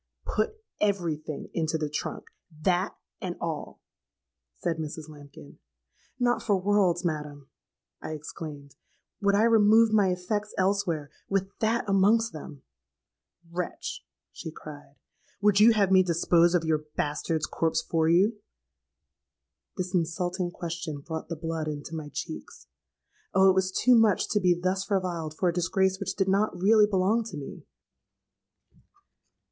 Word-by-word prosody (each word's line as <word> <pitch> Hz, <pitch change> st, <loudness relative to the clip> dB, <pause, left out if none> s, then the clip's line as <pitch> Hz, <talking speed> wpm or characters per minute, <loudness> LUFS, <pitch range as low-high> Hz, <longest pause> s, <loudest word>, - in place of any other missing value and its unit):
'Put 435 Hz, -, -1 dB, 0.2 s
every 190 Hz, -6 st, +1 dB
thing 150 Hz, -1 st, -8 dB
into 160 Hz, -1 st, 0 dB
the 155 Hz, -1 st, -2 dB
trunk—that, 175 Hz, +4 st, -3 dB, 0.3 s
and -, -, -3 dB
all!' -, -, -5 dB, 0.8 s
said 170 Hz, -2 st, -2 dB
Mrs. 155 Hz, 0 st, -6 dB
Lambkin.—'Not 145 Hz, -, -6 dB
for 205 Hz, -4 st, +1 dB
worlds, 185 Hz, -3 st, +2 dB
madam,' 150 Hz, -4 st, -4 dB, 0.5 s
I -, -, -5 dB
exclaimed, 150 Hz, -2 st, -8 dB, 0.5 s
'would 200 Hz, 0 st, +3 dB
I 210 Hz, -, +4 dB
remove 225 Hz, 0 st, +5 dB
my 205 Hz, -3 st, +4 dB
effects 205 Hz, +4 st, -2 dB
elsewhere, 185 Hz, -6 st, 0 dB, 0.2 s
with 195 Hz, 0 st, -1 dB
that 225 Hz, +1 st, +1 dB
amongst 205 Hz, +2 st, +3 dB
them!'—"Wretch!' 155 Hz, -, -9 dB, 0.3 s
she 165 Hz, -, -7 dB
cried, 145 Hz, -2 st, -11 dB, 0.4 s
'would 205 Hz, -1 st, +4 dB
you 220 Hz, +3 st, +8 dB
have 200 Hz, -3 st, +2 dB
me 190 Hz, -1 st, +7 dB
dispose 170 Hz, 0 st, +3 dB
of 170 Hz, -, +2 dB
your 155 Hz, -1 st, +1 dB
bastard's 150 Hz, +1 st, -1 dB
corpse 165 Hz, -1 st, 0 dB
for 160 Hz, -1 st, +1 dB
you?'—This 190 Hz, -1 st, -4 dB
insulting 175 Hz, +1 st, -1 dB
question 165 Hz, -3 st, -5 dB
brought 160 Hz, +2 st, -6 dB
the 170 Hz, -, -3 dB
blood 160 Hz, -1 st, -3 dB
into 150 Hz, +1 st, -5 dB
my 155 Hz, -2 st, -5 dB
cheeks. -, -, -7 dB, 0.7 s
Oh! 190 Hz, 0 st, +7 dB
it -, -, +1 dB
was 190 Hz, 0 st, +1 dB
too 250 Hz, +6 st, +4 dB
much 225 Hz, -4 st, +4 dB
to 210 Hz, -, +2 dB
be 180 Hz, -3 st, +3 dB
thus 190 Hz, +2 st, -1 dB
reviled 175 Hz, -6 st, -1 dB
for 185 Hz, -, +1 dB
a -, -, -1 dB
disgrace 190 Hz, +2 st, +1 dB
which 200 Hz, -, -3 dB
did 195 Hz, -1 st, 0 dB
not 200 Hz, 0 st, +1 dB
really 210 Hz, +2 st, +5 dB
belong 205 Hz, +3 st, +2 dB
to 210 Hz, -8 st, -7 dB
me. 140 Hz, -, -9 dB
180 Hz, 135 wpm, -27 LUFS, 155-200 Hz, 0.8 s, you